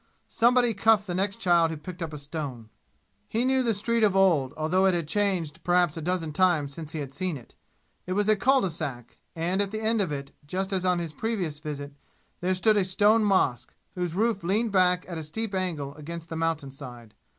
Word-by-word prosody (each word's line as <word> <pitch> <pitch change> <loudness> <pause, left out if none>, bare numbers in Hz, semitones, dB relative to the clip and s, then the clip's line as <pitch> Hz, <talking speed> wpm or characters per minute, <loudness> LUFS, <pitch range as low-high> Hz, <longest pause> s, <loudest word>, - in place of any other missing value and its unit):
Somebody 245 0 +3
cuffed 210 0 +3
the 180 - -4
next 195 +2 0
child 170 -2 +4
who 160 - -4
picked 175 +4 -9
up 165 -2 -3
a 150 - -6
stone. 140 -6 -6 0.6
He 230 +3 0
knew 265 0 +3
the 230 -4 +1
street 230 +3 0
of 205 -3 +3
old, 170 -9 +3
although 180 +5 +2
it 185 - +3
had 170 -3 -2
changed 175 -5 -1
perhaps 175 -2 +3
a 165 - -5
dozen 165 -2 -2
times 155 -6 +2
since 155 0 -8
he 160 - -3
had 135 -1 -7
seen 180 0 -2
it. 120 - -15 0.5
It 185 - -1
was 205 +1 +1
a 215 - +5
cul 265 +6 +3
de 190 - -1
sac, 135 -7 -6 0.2
and 175 +4 0
at 200 - 0
the 215 +2 -4
end 220 0 +1
of 185 - -1
it, 140 -1 -5 0.2
just 190 +5 -2
as 185 -1 0
on 180 -1 +3
his 165 -3 -4
previous 180 -7 -2
visit, 145 -2 -6 0.5
there 185 +1 0
stood 215 +3 +3
a 200 - +4
stone 205 +4 +3
mosque, 135 - +1 0.2
whose 175 -2 -3
roof 220 -1 +1
leaned 210 +6 +1
back 180 -2 +3
at 170 -3 -5
a - - -5
steep 205 +8 -4
angle 165 -7 -2
against 165 +3 -8
the 165 - -5
mountain 160 -4 -1
side. 120 -5 -11
180 Hz, 220 wpm, -27 LUFS, 155-200 Hz, 0.6 s, a